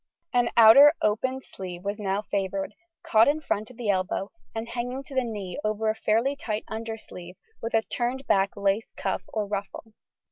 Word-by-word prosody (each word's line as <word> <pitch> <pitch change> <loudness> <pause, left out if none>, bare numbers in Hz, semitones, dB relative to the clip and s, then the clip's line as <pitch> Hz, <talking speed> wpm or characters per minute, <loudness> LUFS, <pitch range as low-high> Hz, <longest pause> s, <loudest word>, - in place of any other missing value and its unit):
An 245 -1 +3
outer 275 +7 +9
opened 260 +5 0
sleeve 180 -2 -8
was 205 +2 -3
now 200 0 -1
favoured, 195 0 -2 0.3
caught 220 0 +5
in 295 +2 +2
front 215 -8 -2
at 250 - -15
the 225 -4 +1
elbow 190 +1 -2 0.2
and 225 +1 -3
hanging 245 +3 -4
to 275 - -12
the 260 -1 +2
knee 205 -6 -5
over 215 +1 0
a - - -6
fairly 230 +6 +1
tight 220 -5 -3
undersleeve 220 -5 -7 0.3
with 230 0 -2
a 220 - +3
turned 255 +4 -3
back 195 +1 +2
lace 200 +2 0
cuff - - -1
or 215 -2 -2
ruffle. 205 +2 -5
220 Hz, 180 wpm, -26 LUFS, 200-240 Hz, 0.3 s, outer